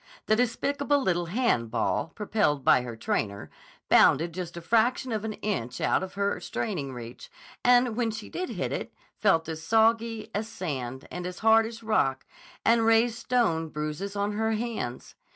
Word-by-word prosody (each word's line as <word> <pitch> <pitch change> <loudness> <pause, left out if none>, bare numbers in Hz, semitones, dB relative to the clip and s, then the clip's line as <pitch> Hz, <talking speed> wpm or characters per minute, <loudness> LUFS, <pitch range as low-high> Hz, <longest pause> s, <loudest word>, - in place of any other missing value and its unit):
The 215 - +3
despicable 280 +5 +1
little 175 -8 0
hand 175 - +1
ball, 115 0 -1
propelled 205 - 0
by - - +6
her 120 -2 -6
trainer, 100 -2 -3 0.4
bounded 165 +4 +5
just 175 -1 -6
a - - -5
fraction 235 +6 +1
of 215 -2 -2
an 220 -1 -3
inch 155 - -3
out - - +2
of 190 0 -6
her 200 0 0
straining 160 -11 -3
reach, 120 -1 -9 0.3
and 245 -2 +4
when 235 -1 0
she 220 -1 -6
did 365 0 -4
hit - - -3
it, - - -4 0.3
felt 165 -6 +3
as 160 -1 -5
soggy 225 +2 +2
as 210 +2 -2
sand 130 - -5
and 180 0 -4
as 180 0 -7
hard 225 0 +6
as 230 0 -10
rock 135 -12 +1 0.4
and 230 0 +4
raised 225 +1 +3
stone 220 -11 +1
bruises 155 +7 -4
on 200 +1 0
her 220 +1 0
hands. 215 - -4
210 Hz, 170 wpm, -27 LUFS, 160-225 Hz, 0.4 s, by